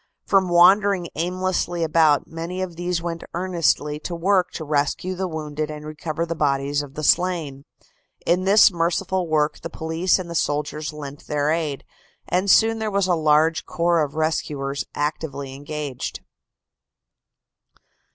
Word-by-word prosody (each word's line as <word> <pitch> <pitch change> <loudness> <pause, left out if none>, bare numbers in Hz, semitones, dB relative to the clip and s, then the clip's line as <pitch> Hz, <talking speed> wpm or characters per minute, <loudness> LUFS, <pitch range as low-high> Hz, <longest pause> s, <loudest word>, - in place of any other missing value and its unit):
From 190 -2 +3
wandering 185 +1 +5
aimlessly 175 0 -1
about, 155 -2 +3
many 170 +3 -5
of 175 -3 -6
these 175 0 -2
went 170 -1 -4
earnestly 170 -4 0
to 170 +2 -5
work 185 +2 +2
to 160 - -5
rescue 150 +5 0
the 185 +1 -3
wounded 155 -2 -4
and 150 0 -7
recover 155 +2 -4
the 170 - -3
bodies 145 -2 0
of 140 -1 -10
the 155 - -5
slain. 160 -5 +1 0.6
In 180 +2 +2
this 205 +2 +7
merciful 175 +2 -1
work 155 -1 0
the 165 - -5
police 160 +3 0
and 185 -2 -6
the 170 - -6
soldiers 150 0 -1
lent 145 -1 -9
their 150 0 0
aid, 155 -4 -2 0.4
and 185 +3 0
soon 225 +3 +5
there 220 -1 -1
was 200 -2 +1
a 185 - +2
large 155 0 +2
corps 170 -1 +1
of 145 -1 -2
rescuers 145 -3 -2
actively 145 -2 -3
engaged. 145 -1 -5
165 Hz, 150 wpm, -23 LUFS, 150-180 Hz, 0.6 s, this